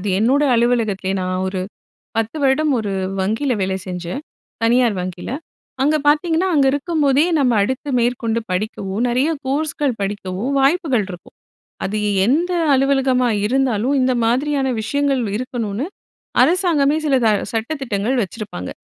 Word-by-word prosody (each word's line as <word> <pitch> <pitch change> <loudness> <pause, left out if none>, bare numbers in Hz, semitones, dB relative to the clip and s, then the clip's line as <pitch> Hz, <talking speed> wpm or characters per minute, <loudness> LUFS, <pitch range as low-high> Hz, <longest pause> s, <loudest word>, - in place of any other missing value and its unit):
அது 205 - -3
என்னோட 260 +7 +3
அலுவலகத்திலயே 225 -5 +1
நான் 185 0 -2
ஒரு 190 -1 -3 0.6
10 225 +6 -1
வருடம் 290 +3 +3
1 210 -2 -3 0.3
வங்கியில 225 +7 0
வேலை 190 0 0
செஞ்சேன். 180 - -5 0.4
தனியார் 235 -1 +3
வங்கியில. 180 +4 -6 0.5
அங்க 300 +3 +3
பார்த்தீங்கன்னா, 325 +4 +2
அங்க 275 -2 +4
இருக்கும்போதே 285 -1 +2 0.2
நம்ம 250 -4 +3
அடுத்து 260 +7 -2
மேற்கொண்டு 235 -1 0
படிக்கவோ, 190 0 -3
நெறைய 255 +5 +1 0.2
கோர்ஸ்கள் 290 -1 -1
படிக்கவோ 195 0 -3 0.2
வாய்ப்புகள் 270 - +2
இருக்கும். 175 -1 -11 0.5
அது 210 +3 -2 0.3
எந்த 320 - +1 0.2
அலுவலகமா 265 -2 +2 0.2
இருந்தாலும், 255 +1 +1
இந்த 255 0 +2
மாதிரியான 270 +3 +1
விஷயங்கள் 280 +2 0 0.2
இருக்கணுன்னு 240 -1 -3 0.6
அரசாங்கமே 315 -2 +3
சில 280 - +2
ச 220 - +5 0.2
சட்ட 225 +4 -2
திட்டங்கள் 230 0 -1
வச்சிருப்பாங்க. 195 - -6
250 Hz, 125 wpm, -19 LUFS, 210-280 Hz, 0.6 s, ச